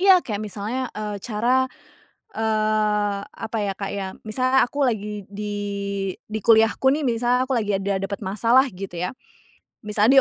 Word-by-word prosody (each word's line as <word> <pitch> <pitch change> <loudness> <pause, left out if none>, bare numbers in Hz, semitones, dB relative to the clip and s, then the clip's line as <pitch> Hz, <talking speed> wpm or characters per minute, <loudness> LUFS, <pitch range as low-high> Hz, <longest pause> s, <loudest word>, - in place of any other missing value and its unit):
iya, 380 0 +8
kayak 210 -2 -3
misalnya, 215 +5 -3
eee, 210 -1 -3
cara, 245 +5 +1 0.7
eee, 215 -2 +1
apa 220 +1 -6
ya, 200 -2 -1
Kak, 195 0 -4
ya, 195 -1 -3 0.2
misalnya 255 +4 +2
aku 280 +1 +1
lagi 210 -3 -3
di 205 +1 -5 0.7
di 220 +1 -4
kuliahku 225 +4 +4
nih. 305 - -2
Misalnya 245 +1 +2
aku 260 -2 0
lagi 205 -2 0
ada 195 0 -1
dapat 200 +2 -4
masalah 230 +7 +4
gitu 185 -1 -7
ya. 180 +2 -2 0.7
Misalnya 215 +5 +5
215 Hz, 155 wpm, -23 LUFS, 205-245 Hz, 0.7 s, iya